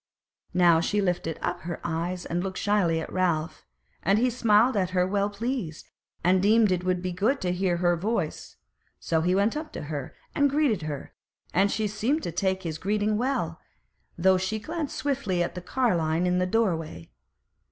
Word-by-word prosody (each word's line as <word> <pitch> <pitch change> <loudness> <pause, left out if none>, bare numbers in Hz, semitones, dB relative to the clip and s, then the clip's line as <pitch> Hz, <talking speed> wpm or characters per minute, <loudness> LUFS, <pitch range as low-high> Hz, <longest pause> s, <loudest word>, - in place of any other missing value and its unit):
Now 175 -2 +5
she 210 +4 0
lifted 175 -4 -1
up - - -1
her 170 0 -5
eyes 175 +2 -3
and 175 +1 -2
looked 190 -1 -4
shyly 190 -6 +2
at 160 - -6
Ralph, 170 -3 -1 0.3
and 195 +2 +3
he 250 +3 +2
smiled 230 +1 +4
at 185 -3 +1
her 180 - +4
well 200 +2 0
pleased, 205 - -4 0.3
and 180 +2 +4
deemed 215 +1 +4
it 180 -1 0
would 180 -1 0
be 185 - -2
good 215 +10 +1
to 180 - 0
hear 180 -1 0
her 175 0 +2
voice; 190 -2 -3 0.4
so 160 -1 0
he 180 +3 +2
went 200 +5 +2
up 310 +1 -5
to - - -5
her 145 -2 -5 0.2
and 285 0 +3
greeted 275 - +1
her, 145 -3 -6 0.4
and 200 - +3
she 215 -1 0
seemed 230 +10 -1
to - - -3
take 190 +2 -1
his 160 -3 -4
greeting 210 +2 0
well, 230 -9 -1 0.6
though 185 +2 +4
she 190 +4 -1
glanced 310 +6 -4
swiftly 260 -11 0
at 170 - -4
the 180 - -6
carline 175 -7 +1
in 180 0 +2
the 180 - +1
doorway. 170 - -1
185 Hz, 185 wpm, -26 LUFS, 175-215 Hz, 0.6 s, Now